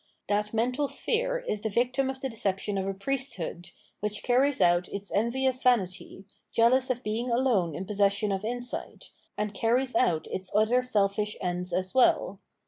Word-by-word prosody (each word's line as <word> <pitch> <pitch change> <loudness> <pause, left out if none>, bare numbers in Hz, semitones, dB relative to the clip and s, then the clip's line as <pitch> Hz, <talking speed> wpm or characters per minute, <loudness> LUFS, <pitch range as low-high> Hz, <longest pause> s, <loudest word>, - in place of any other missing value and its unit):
That 210 +1 0
mental 250 +6 0
sphere - - -1
is 210 - -2
the 220 - -2
victim 250 +5 +1
of 265 0 -5
the 270 - -1
deception 205 -3 -2
of 190 - -2
a 195 - -1
Priesthood, 200 -7 -3 0.3
which 210 0 -1
carries 260 +3 +2
out 175 -1 +3
its 200 0 -6
envious 255 +4 0
vanity, 195 -5 0 0.3
jealous 255 +3 +3
of 255 0 -1
being 225 +4 -2
alone 235 - +1
in 185 - -4
possession 200 +1 +1
of 195 +1 -2
insight, 245 +2 -5 0.3
and 210 0 -2
carries 245 +5 +1
out 170 -10 +2
its 185 0 -4
other 220 +4 +4
selfish 210 -3 0
ends 180 0 -3
as 185 +1 -1
well. 240 -6 +3
215 Hz, 165 wpm, -28 LUFS, 195-255 Hz, 0.3 s, other